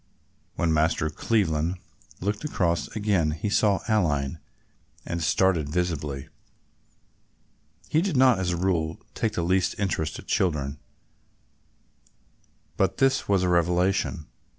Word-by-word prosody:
When 85 -2 +1
Master 80 0 +1
Cleveland 85 -4 0 0.4
looked 105 +5 -2
across 85 - 0
again 100 -7 +1
he 80 +7 -3
saw 105 -3 +3
Aline 80 - +1 0.7
and 85 0 -3
started 80 -2 +2
visibly. 75 -5 -2 1.6
He 155 - +2
did 180 -6 -1
not 130 -5 +5
as 90 -2 -1
a 85 - -1
rule 85 -3 0
take 110 -2 -1
the 85 - -1
least 90 +2 +1
interest 85 -6 -1
in - - -11
children, 75 -5 0 2.0
but - - +1
this 135 -4 +2
was 100 -2 +3
a 90 - +1
revelation. 90 0 +1
90 Hz, 120 wpm, -26 LUFS, 80-100 Hz, 2.0 s, not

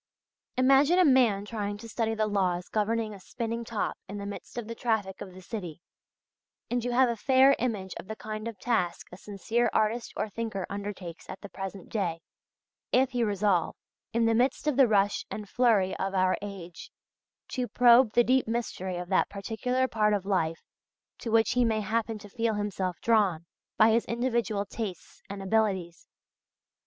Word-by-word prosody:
Imagine 275 +6 +5
a 365 - +6
man 240 -8 +4
trying 205 -2 -3
to 230 +2 -10
study 225 0 -1
the 215 0 +1
laws 185 -4 0
governing 220 0 0
a 200 - -10
spinning 230 +4 -4
top 225 -2 -3
in 205 - -5
the 200 - -5
midst 200 +4 -8
of 235 -3 -4
the 230 - -4
traffic 220 -5 -2
of 185 -3 -8
the 185 - -12
city, 180 -7 -6 0.9
and 245 -1 0
you 245 - -1
have 255 +1 +4
a 235 - -1
fair 265 +4 +5
image 210 -6 -2
of - - -10
the 220 - -5
kind 215 +1 -6
of 230 -3 -6
task 185 -6 -1
a 180 - -10
sincere 225 +4 -1
artist 220 +2 0
or - - -1
thinker 215 -3 -4
undertakes 200 -4 -6
at 190 - -7
the - - -9
present 195 -1 -7
day, 175 -6 -2 0.7
if 260 +1 +3
he 245 -2 0
resolve, 200 -5 +1 0.4
in 230 0 +2
the 225 - +3
midst 250 +6 +1
of 300 -3 +1
the 265 -1 +6
rush 205 -2 +2
and 210 -1 -6
flurry 215 -4 +2
of 195 0 -2
our 185 0 +3
age, 190 -4 -8 0.6
to 250 -2 -2
probe 240 +1 +5
the 240 - +5
deep 255 +1 +2
mystery 205 -6 -3
of 175 0 -5
that 190 - +2
particular 245 +6 -1
part 210 -3 +2
of 195 -2 -3
life 165 -5 0 0.6
to 230 - -5
which 225 0 +3
he 250 0 +3
may 220 -2 +1
happen 225 +1 -1
to 210 0 -12
feel 225 +1 -1
himself 195 -3 -2
drawn 200 -8 +2 0.3
by 220 +1 +6
his 230 +1 +2
individual 235 -4 -1
tastes 200 -3 -7
and 195 0 -6
abilities. 190 -4 0
215 Hz, 185 wpm, -28 LUFS, 195-235 Hz, 0.9 s, a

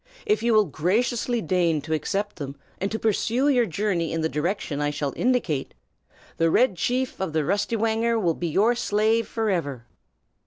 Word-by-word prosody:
If 425 -1 +2
you 235 -1 +2
will 215 -1 +5
graciously 225 - 0
deign 170 -2 +1
to 160 +2 -4
accept 195 +7 -2
them, 140 -3 -6 0.2
and 195 +2 -2
to 220 - -1
pursue 225 +5 +1
your 245 -4 +3
journey 180 -2 -1
in 165 - -1
the 160 - 0
direction 150 -2 -2
I 145 - +1
shall 145 -2 -3
indicate, 235 - 0 0.6
the 165 0 +3
Red 225 +3 +3
Chief 255 +7 -1
of 190 -5 -3
the 155 -1 +1
Rustywhanger 225 +5 +1
will 175 -5 +1
be 175 - -3
your 210 +9 +3
slave 225 -1 +1
forever." 170 - -2
200 Hz, 170 wpm, -25 LUFS, 160-230 Hz, 0.6 s, will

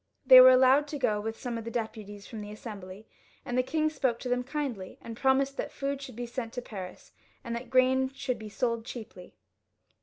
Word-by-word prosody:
They 255 -1 +11
were 255 - +10
allowed 260 +3 +5
to 295 - -5
go 215 -6 0
with 225 +1 -5
some 240 -2 -4
of - - -7
the 230 - -5
deputies 215 -3 -5
from 225 -3 -8
the 205 - -8
Assembly, 205 -2 -9 0.4
and 245 - -3
the 255 - +4
king 310 +4 0
spoke 270 -6 0
to 250 - -4
them 250 0 0
kindly, 260 -9 -4
and 230 - -8
promised 270 +2 +1
that - - -3
food 280 -1 -3
should 260 -4 -9
be 240 +1 -4
sent 235 -1 -5
to 245 - -4
Paris, 190 -6 -9 0.3
and 235 - -4
that 235 +1 -6
grain 260 +1 +3
should 270 -2 -3
be 215 -1 -8
sold 230 0 -1
cheaply. 225 -6 -10
245 Hz, 215 wpm, -29 LUFS, 220-265 Hz, 0.4 s, They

